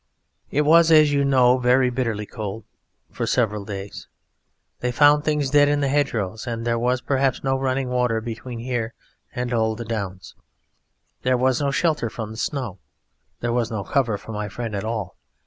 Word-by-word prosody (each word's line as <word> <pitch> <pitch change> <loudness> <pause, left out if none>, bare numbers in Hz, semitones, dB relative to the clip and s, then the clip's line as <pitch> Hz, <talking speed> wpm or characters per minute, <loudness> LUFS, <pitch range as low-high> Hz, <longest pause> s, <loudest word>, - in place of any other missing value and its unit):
"It 145 - +1
was, 165 +2 +5
as 155 -2 +6
you 140 0 +2
know, 130 -2 +4
very 125 +1 +3
bitterly 115 -4 -2
cold 105 +1 -6 0.5
for - - -3
several 105 -4 +1
days. 100 -1 -7 0.7
They 125 - -1
found 145 +3 +5
things 150 -3 0
dead 145 0 +5
in 145 0 +1
the 140 - +1
hedgerows, 115 -7 -1
and 115 -1 -3
there 115 -1 +1
was 125 +1 +1
perhaps 135 -1 0
no 135 -1 +1
running 130 0 -1
water 125 -2 +1
between 115 +2 -6
here 120 -1 -3 0.4
and 125 0 -2
the 110 0 0
Downs. 100 -5 -5 0.9
There 130 0 +2
was 130 +1 +1
no 140 - +1
shelter 150 -4 0
from 110 -1 -6
the 110 - -9
snow. 120 - -3 0.6
There 120 0 -1
was 120 -2 0
no 110 -3 -3
cover 120 -3 0
for 110 - -10
my 105 -1 -4
friend 115 +1 -5
at 100 - -3
all. 110 -4 -4
125 Hz, 180 wpm, -23 LUFS, 110-135 Hz, 0.9 s, as